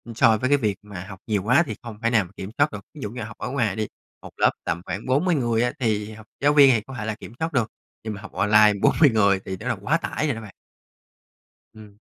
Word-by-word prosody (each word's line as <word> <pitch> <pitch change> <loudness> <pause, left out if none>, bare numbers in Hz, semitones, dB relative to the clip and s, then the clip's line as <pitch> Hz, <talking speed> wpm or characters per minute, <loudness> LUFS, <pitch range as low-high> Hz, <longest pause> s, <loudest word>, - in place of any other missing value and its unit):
so 110 -1 +5
với 130 +4 -1
cái 145 - +5
việc 105 -7 0
mà 100 -4 -8
học 95 -2 -10
nhiều 105 -4 0
quá 125 +10 +4
thì 110 - -5
không 110 -3 -9
thể 115 - +3
nào 110 -6 +2
kiểm 95 - -6
soát 145 +1 +3
được. - - -6
Ví 150 - -11
dụ 105 - -3
như 125 - -6
học 110 +1 -9
ở - - -4
ngoài 120 -8 0
đi, 110 -1 -2 0.3
một - - -11
lớp - - +4
tầm 85 - -2
khoảng 100 - -5
40 155 +7 +2
người 120 -3 +1
á, 125 - +1
thì 110 -3 -1
học 110 0 -12
giáo 145 +1 +3
viên 140 -2 +8
thì 110 - 0
có 135 - -9
thể 110 - -4
là 110 -1 -2
kiểm - - -10
soát 160 0 -2
được, 120 -4 0 0.3
nhưng 110 -1 -4
mà 100 - -9
học - - -10
online 105 0 +5
40 150 -3 +5
người 100 -4 +3
thì 95 - -4
nó 115 - -6
là 120 - +1
quá 150 +10 +2
tải 155 - -3
rồi 135 - 0
đó 115 - -7
bạn. 105 -4 -11 1.2
Ừm. 105 -2 -14
110 Hz, 275 wpm, -24 LUFS, 105-130 Hz, 1.2 s, viên